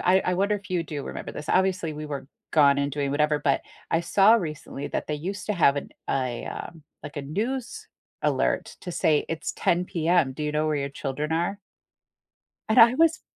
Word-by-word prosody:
I 185 +2 +4
I 180 - 0
wonder 200 +3 +2
if 200 -2 -7
you 175 -2 +1
do 150 -3 -5
remember - - -6
this. 150 - -8
Obviously, 185 -4 +1
we 150 0 -6
were 140 -2 -6 0.2
gone 140 -3 +5
and 140 0 0
doing 140 -1 -1
whatever, 150 0 +2
but, 140 - +2 0.3
I 165 - +3
saw 195 +5 +5
recently 150 -7 -3
that - - -3
they 150 - 0
used 185 +6 -5
to 210 - +1
have 160 -8 +4
an 140 - -4 0.2
a, 130 -3 -1
um, 165 -2 -7 0.2
like 145 0 -9
a 145 - -3
news 245 - -3 0.3
alert - - 0
to 180 - -5
say 155 -2 +2
"It's 165 - -3
10 175 +1 +1
PM, 170 -5 +1
do 150 - -6
you 150 - -1
know 155 +1 +1
where 155 -1 +1
your 140 -1 -2
children 140 +2 -3
are?" 175 +5 -1 1.1
and 220 - +5
I 235 +2 +8
was 325 +1 +3
160 Hz, 205 wpm, -26 LUFS, 145-190 Hz, 1.1 s, I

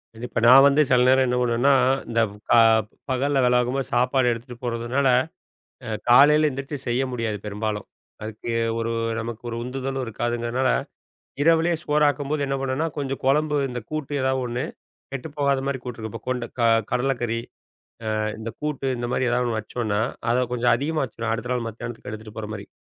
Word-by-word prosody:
இது 115 +2 -6
இப்ப - - -1
நான் 135 +3 +9
வந்து 140 +2 +4
செல 125 -2 +4
நேரம் 130 0 +5
என்ன 125 0 0
பண்ணுவேன்னா, 125 +3 +3 0.4
இந்த 115 0 +2 0.3
ப - - -1 0.6
பகல்ல 135 +2 +1
வேல 125 0 +3
பாக்கும்போது 125 0 0
சாப்பாடு 125 +1 +2
எடுத்துட்டு 120 +1 -6
போறதுனால 120 +3 0 0.8
அ - - -4 0.2
காலையில 150 +5 +7
எழுந்திரிச்சு 135 +1 -4
செய்ய 120 +2 +1
முடியாது 115 -4 -2
பெரும்பாலும். 105 0 -3 0.3
அதுக்கு 110 +2 -6 0.3
ஒரு 115 0 -1 0.3
நமக்கு 115 +1 -6
ஒரு 115 - -4
உந்துதலும் 135 +1 -3
இருக்காதுங்கிறனால 120 +3 -1 0.7
இரவிலேயே 165 +2 +3
சோறாக்கும்போது 150 0 +1
என்ன 135 0 -1
பண்ணுவேன்னா, 135 +4 -1
கொஞ்சம் 135 -1 -3
கொழம்பு 150 +2 +2
இந்த 125 -1 -4
கூட்டு 155 -2 -4
எதாவது 130 0 +1
ஒன்னு 120 +1 -2 0.5
கெட்டு 135 +3 -5
போகாத 140 -2 +1
மாதிரி 140 -1 -1
கூட்டு 125 -2 -6
இருக்கு. 110 0 -5
இப்போ 115 - -8
கொண்ட 125 -2 -1
க 120 - +1 0.3
கடலை 135 +2 +1
கறி, 115 -1 -1 0.8
அ - - 0 0.2
இந்த 110 +1 -5
கூட்டு 150 -3 -3
இந்த 120 0 -3
மாரி 130 - +1
ஏதாவது 125 0 +1
ஒன்னு 110 - -1
வச்சோன்னா, 110 -1 -2 0.3
அதை 125 - +3
கொஞ்சம் 120 0 +2
அதிகமா 150 +5 -1
வச்சுருவோம். 115 -2 -4
அடுத்த 120 +2 -5
நாள் 120 -2 -2
மத்தியானத்துக்கு 115 0 -7
எடுத்துட்டு 110 0 -9
போற 105 -1 -5
மாரி. 100 -1 -8
125 Hz, 175 wpm, -24 LUFS, 115-135 Hz, 0.8 s, நான்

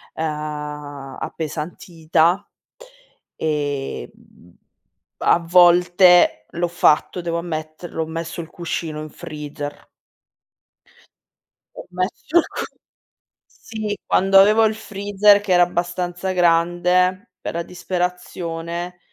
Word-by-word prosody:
uhm, 150 -3 -5
appesantita. 165 +3 -1 0.9
Ehm, 145 - -2 1.1
a - - +3
volte 175 - +5
l'ho 175 +1 -1
fatto, 175 +1 +2
devo 170 0 -2
ammetterlo 160 0 -5
ho - - -5
messo 165 +1 -5
il 165 - -11
cuscino 160 -3 -4
in 155 - -7
freezer. 145 -1 -8 1.9
Ho - - -9
messo 185 - -2
il 340 - +3
cu - - -5 0.8
sì 215 -2 -6
quando 195 +1 +4
avevo 215 +3 +6
il 220 0 +2
freezer 205 -1 +3
che 200 -3 -2
era 175 0 +6
abbastanza 175 +1 -2
grande, 180 +3 +2
per - - -5
la 170 - -1
disperazione, 175 -1 -4
175 Hz, 95 wpm, -21 LUFS, 160-180 Hz, 1.9 s, avevo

